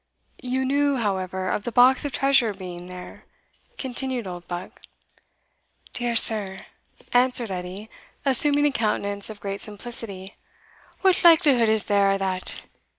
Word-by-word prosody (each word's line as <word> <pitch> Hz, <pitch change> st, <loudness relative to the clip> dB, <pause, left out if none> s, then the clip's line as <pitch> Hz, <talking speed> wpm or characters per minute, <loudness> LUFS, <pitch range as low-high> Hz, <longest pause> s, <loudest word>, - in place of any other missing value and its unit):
"You 260 Hz, +1 st, -1 dB
knew, 285 Hz, +1 st, +2 dB
however, 190 Hz, -5 st, -2 dB
of -, -, -1 dB
the 240 Hz, -, -4 dB
box 255 Hz, +4 st, +5 dB
of 290 Hz, -, -2 dB
treasure 260 Hz, -5 st, +2 dB
being 180 Hz, -2 st, -8 dB
there?" 180 Hz, 0 st, -10 dB, 0.5 s
continued 260 Hz, -2 st, -3 dB
Oldbuck. 175 Hz, 0 st, -7 dB, 1.1 s
"Dear 240 Hz, -1 st, -2 dB
sir," 200 Hz, -4 st, 0 dB, 0.5 s
answered 245 Hz, -3 st, +2 dB
Edie, 185 Hz, +3 st, -6 dB, 0.4 s
assuming 285 Hz, +2 st, +4 dB
a 295 Hz, -, +3 dB
countenance 205 Hz, -4 st, -2 dB
of 215 Hz, -1 st, -9 dB
great 200 Hz, -1 st, -5 dB
simplicity, 205 Hz, -3 st, -6 dB, 0.6 s
"what 375 Hz, -1 st, +3 dB
likelihood 290 Hz, -9 st, +6 dB
is 220 Hz, -1 st, +2 dB
there 200 Hz, -1 st, +2 dB
o'that? 190 Hz, -2 st, -1 dB
220 Hz, 125 wpm, -24 LUFS, 195-260 Hz, 1.1 s, likelihood